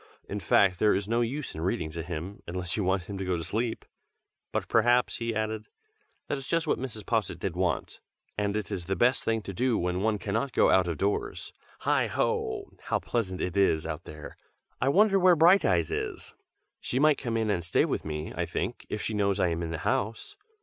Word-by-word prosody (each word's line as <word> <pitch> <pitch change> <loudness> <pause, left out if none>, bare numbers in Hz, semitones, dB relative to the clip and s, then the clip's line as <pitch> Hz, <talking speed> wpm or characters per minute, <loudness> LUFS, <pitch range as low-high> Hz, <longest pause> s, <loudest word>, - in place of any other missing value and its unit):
In 105 - -3
fact, 90 0 +3
there 105 -2 +4
is 100 +1 -2
no 115 +2 +1
use 135 +5 -2
in 80 - -6
reading 80 -2 -1
to 85 +1 -4
him, 85 +3 -6
unless 90 +1 -2
you 105 - 0
want 95 0 +1
him 100 +1 -7
to - - -2
go 90 -2 0
to 80 - -4
sleep. 110 +7 -2 0.7
But - - -2
perhaps," 120 +1 +3
he 115 -1 -2
added 110 0 -2 0.6
"that 145 - -2
is 135 - -9
just 165 0 +1
what 155 - 0
Mrs. 115 -6 -6
Posset 110 -7 0
did 90 0 -3
want, 90 -1 -1 0.4
and 100 0 -1
it 105 0 -4
is 90 -4 -3
the 95 +2 -1
best 125 +3 +3
thing 115 -1 0
to 100 - -6
do 125 +4 +1
when 90 +1 -1
one 110 0 +1
cannot 115 +7 -2
go - - +4
out 95 -1 +4
of 85 -3 -2
doors. 100 +5 -2 0.3
Heigh - - +2
ho! - - -1
how - - +1
pleasant 95 -6 -2
it 90 - -2
is 95 -5 +3
out 80 +1 -5
there! 75 0 -9 0.4
I 130 - +3
wonder 195 +5 +5
where 180 -1 +6
Brighteyes 160 - +4
is! - - -4 0.5
She 125 - -2
might 150 +1 +4
come 115 -2 -2
in 110 -2 +1
and 90 -4 -1
stay 85 - +2
with - - -2
me, 75 0 -4
I - - -1
think, - - -4
if - - -3
she 110 - -2
knows 100 -1 +1
I 90 - +3
am 85 0 -2
in 85 - -3
the 80 - -3
house." 110 - -1
100 Hz, 220 wpm, -28 LUFS, 90-115 Hz, 0.7 s, where